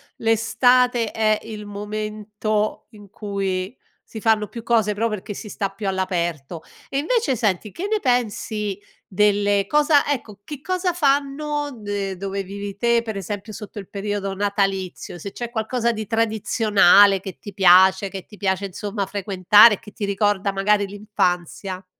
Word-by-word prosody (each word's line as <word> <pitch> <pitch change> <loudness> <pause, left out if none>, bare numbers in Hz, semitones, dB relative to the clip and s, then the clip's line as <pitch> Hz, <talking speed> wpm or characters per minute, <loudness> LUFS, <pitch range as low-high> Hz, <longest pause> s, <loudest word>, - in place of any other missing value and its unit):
l'estate 235 +1 +2
è 215 -1 +2
il 210 -2 -8
momento 210 +1 -3
in 205 -2 -15
cui 195 +1 -3 0.3
si 220 - -9
fanno 215 -2 +2
più 230 -2 -9
cose, 220 -3 +2
pro 230 +2 0
perché 210 -1 -5
si 210 - -8
sta 195 -2 -2
più 195 0 -6
all'aperto 175 -5 -2 0.3
e 275 - -2
invece, 380 - +1
senti, 205 -2 -1
che 380 +4 -4
ne 430 0 0
pensi 215 - -1 0.3
delle 205 0 +2
cosa 295 +1 +3
ecco, 215 -7 -4
che 290 +1 -8
cosa 370 +1 -1
fanno 290 -1 0
de 200 -2 -4
dove 195 +1 -3
vivi 200 +1 -7
te, 235 +1 +2
per 220 -3 -5
esempio, 205 +3 -6
sotto 210 +1 -10
il 195 -2 -7
periodo 200 -1 -3
natalizio? 195 -3 -2
Se 200 +4 -7
c'è 240 -1 -6
qualcosa 235 +1 -1
di 220 -3 -5
tradizionale 210 -3 +4
che 190 0 -8
ti 205 - -10
piace, 190 +1 +5
che 190 -2 -8
ti 210 - -15
piace, 190 -1 -1
insomma, 200 +1 -4
frequentare, 200 +2 +5
che 210 - -13
ti 205 - -4
ricorda 200 0 0
magari 200 +1 +1
l'infanzia. 190 -2 -2
205 Hz, 155 wpm, -22 LUFS, 195-225 Hz, 0.3 s, piace